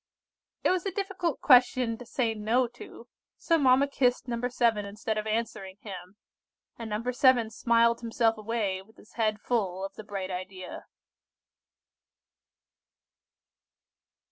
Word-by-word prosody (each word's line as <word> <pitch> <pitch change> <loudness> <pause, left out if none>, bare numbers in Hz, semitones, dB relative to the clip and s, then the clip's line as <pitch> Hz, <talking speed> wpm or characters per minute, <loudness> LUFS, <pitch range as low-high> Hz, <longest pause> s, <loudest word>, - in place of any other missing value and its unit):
It - - +3
was 365 -1 0
a - - -1
difficult 380 -5 -2
question 250 -2 +5
to 245 - -10
say 235 -2 0
"No" 220 +4 +1
to, 240 0 -12 0.3
so 330 -1 +2
mamma 270 0 +5
kissed 255 -2 +1
No. 240 0 -1
7, 230 -4 +1
instead 210 +2 -4
of 215 0 -3
answering 215 -4 -3
him, 185 -2 -9 0.6
and 230 -2 -7
No. 225 +4 -2
7 250 -3 +4
smiled 235 +1 +2
himself 230 -1 +1
away, 215 -3 -2
with 220 +3 -22
his - - -19
head 215 -2 0
full 195 -5 -1
of 195 - -8
the 215 - -9
bright 195 -2 -5
idea. 185 0 -7
230 Hz, 135 wpm, -28 LUFS, 210-250 Hz, 0.6 s, question